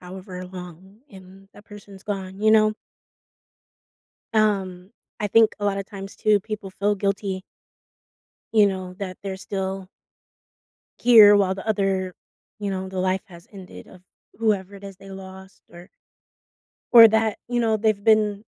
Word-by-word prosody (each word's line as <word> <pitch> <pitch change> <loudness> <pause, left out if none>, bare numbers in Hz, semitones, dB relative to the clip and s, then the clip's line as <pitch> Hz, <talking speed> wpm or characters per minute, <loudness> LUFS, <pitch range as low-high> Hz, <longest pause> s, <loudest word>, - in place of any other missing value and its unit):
however 185 0 -9
long, 180 +2 -12
and 190 0 -15
that 205 - -16
person's 205 -2 -14
gone," 195 -2 -6
you 215 0 +3
know? 215 -1 +4 1.6
Um, 195 -3 0 0.3
I 210 - -1
think 225 +2 +4
a 205 - -2
lotta 195 -1 -1
times 195 0 -10
too, 210 -1 +2
people 210 -1 -7
feel 200 +2 -1
guilty 195 -1 -2 1.1
you 210 -2 +5
know, 185 -1 -5
that 185 -2 -6
they're 190 -1 -5
still 190 -1 -5 1.1
here 220 -4 +8
while 190 -2 +2
the 195 +3 -9
other 195 -3 -1 0.5
you 205 -1 -3
know, 190 -1 -4
the 185 -1 -5
life 185 +1 0
has 170 -2 -16
ended 190 -3 -12
of 180 - -17 0.3
whoever 205 -3 -1
it 200 - -14
is 195 -1 -9
they 195 0 -14
lost 190 0 -12
or 175 +2 -13 1.1
or 230 -1 +11
that, 220 -1 0
you 245 0 -1
know, 225 -2 +1
they've 215 -1 0
been 215 -1 +2
195 Hz, 150 wpm, -23 LUFS, 190-210 Hz, 1.6 s, or